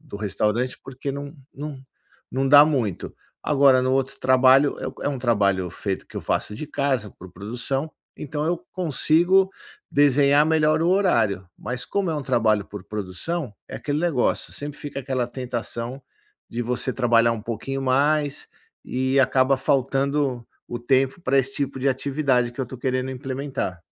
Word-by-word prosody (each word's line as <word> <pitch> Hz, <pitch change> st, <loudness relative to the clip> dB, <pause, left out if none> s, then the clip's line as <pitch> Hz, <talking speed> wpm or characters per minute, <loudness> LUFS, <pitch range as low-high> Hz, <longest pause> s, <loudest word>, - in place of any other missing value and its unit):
do 145 Hz, -9 st, -9 dB
restaurante, 105 Hz, +4 st, -1 dB
porque 135 Hz, +1 st, -5 dB
não 140 Hz, 0 st, -6 dB, 0.2 s
não 145 Hz, -1 st, -6 dB, 0.5 s
não 135 Hz, +1 st, 0 dB
dá 145 Hz, +1 st, +9 dB
muito. 125 Hz, -, -2 dB, 0.3 s
Agora 140 Hz, -3 st, +5 dB
no 130 Hz, 0 st, +1 dB
outro 135 Hz, 0 st, -1 dB
trabalho, 130 Hz, +2 st, +5 dB
é -, -, -3 dB
um -, -, -8 dB
é -, -, +2 dB
um 140 Hz, -3 st, -3 dB
trabalho 100 Hz, -6 st, +1 dB
feito 95 Hz, +2 st, -4 dB
que -, -, -13 dB
eu -, -, -2 dB
faço -, -, -2 dB
de 150 Hz, -, -6 dB
casa, 135 Hz, -7 st, -1 dB
por 90 Hz, 0 st, -13 dB
produção, 125 Hz, -, -3 dB, 0.3 s
então 150 Hz, 0 st, -4 dB
eu 175 Hz, +1 st, +1 dB, 0.2 s
consigo 180 Hz, +3 st, +3 dB, 0.4 s
desenhar 145 Hz, +1 st, +4 dB
melhor 155 Hz, 0 st, +3 dB
o 170 Hz, -, +2 dB
horário. 115 Hz, -, +2 dB
Mas 125 Hz, 0 st, -5 dB
como 200 Hz, -3 st, -1 dB
é 160 Hz, -, -1 dB
um 145 Hz, -, -3 dB
trabalho 110 Hz, -6 st, +2 dB
por 100 Hz, -2 st, -9 dB
produção, 105 Hz, -, -4 dB, 0.2 s
é -, -, -6 dB
aquele 145 Hz, 0 st, -2 dB
negócio, 160 Hz, -8 st, 0 dB
sempre 145 Hz, 0 st, -5 dB
fica 145 Hz, -1 st, -6 dB
aquela 130 Hz, -2 st, -1 dB
tentação 120 Hz, 0 st, -4 dB, 0.5 s
de 120 Hz, +1 st, -3 dB
você 125 Hz, +2 st, -2 dB
trabalhar 115 Hz, -2 st, +3 dB
um 110 Hz, -2 st, -5 dB
pouquinho 125 Hz, +4 st, -4 dB
mais, 145 Hz, +2 st, +1 dB, 0.4 s
e 130 Hz, +2 st, 0 dB
acaba 130 Hz, 0 st, +3 dB
faltando 135 Hz, -1 st, 0 dB, 0.2 s
o 120 Hz, -, -4 dB
tempo 130 Hz, +5 st, +1 dB
pra 135 Hz, -4 st, +2 dB
esse 135 Hz, 0 st, 0 dB
tipo 140 Hz, -2 st, -2 dB
de 140 Hz, -, +2 dB
atividade 130 Hz, -2 st, 0 dB
que 130 Hz, -, -6 dB
eu 130 Hz, -, -2 dB
tô 130 Hz, -, -9 dB
querendo 130 Hz, +1 st, -1 dB
implementar. 130 Hz, -, -4 dB
130 Hz, 170 wpm, -23 LUFS, 120-145 Hz, 0.5 s, dá